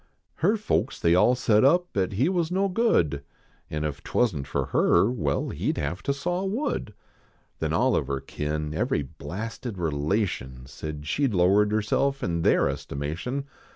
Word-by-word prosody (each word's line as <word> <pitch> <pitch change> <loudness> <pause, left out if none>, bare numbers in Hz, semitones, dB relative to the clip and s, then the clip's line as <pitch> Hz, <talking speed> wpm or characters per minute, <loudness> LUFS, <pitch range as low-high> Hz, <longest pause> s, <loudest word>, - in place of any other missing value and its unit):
Her 200 +8 +2
folks 215 - -1
they 85 - +3
all 105 +8 +5
set 115 -3 +3
up 175 +6 +3
at 95 -1 0
he 125 +10 +2
was 175 -3 0
no 195 +2 +2
good, 135 - +1 0.5
An 75 0 -3
if 75 -2 -3
twasn 110 -12 +1
t - - -3
for - - -1
her 110 - +4
well, 75 - -1
he - - -1
d - - -4
have 90 - -3
to - - -1
saw 175 +7 -2
wood. 195 - -2 0.6
Then - - -1
all - - +2
of 70 - 0
her 70 0 -1
kin, 75 +2 -3
every 75 -2 0
blasted 110 - -6
relation. 75 - -1
Said 75 +2 -7
she 140 - +1
d 105 -7 -2
lowered 100 +4 +4
herself 120 +6 0
in 85 -1 -1
their - - +4
estimation. 80 - -4
100 Hz, 175 wpm, -26 LUFS, -, 0.6 s, all